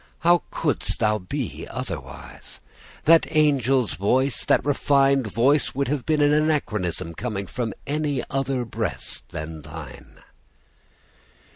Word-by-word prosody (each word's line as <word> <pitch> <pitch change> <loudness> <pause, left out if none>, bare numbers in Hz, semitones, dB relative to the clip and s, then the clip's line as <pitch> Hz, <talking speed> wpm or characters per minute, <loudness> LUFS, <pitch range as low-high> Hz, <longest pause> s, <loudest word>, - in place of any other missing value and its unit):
how 175 +1 +5
couldst 150 -5 0
thou 110 -1 +1
be 90 - -5
otherwise? - - -7 0.5
That 165 +1 +5
angel's 135 - +2
voice, 125 - +1
that - - +3
refined 140 -2 +3
voice, 135 +5 +2
would 140 -1 0
have 145 -3 -2
been 155 -1 +2
an 145 0 +4
anachronism 105 - 0
coming 100 0 -4
from 115 +1 -3
any 145 -2 -1
other 135 -2 -1
breast 110 -4 -4
than 80 0 -6
thine. 75 -4 -11
130 Hz, 120 wpm, -24 LUFS, 105-145 Hz, 0.5 s, how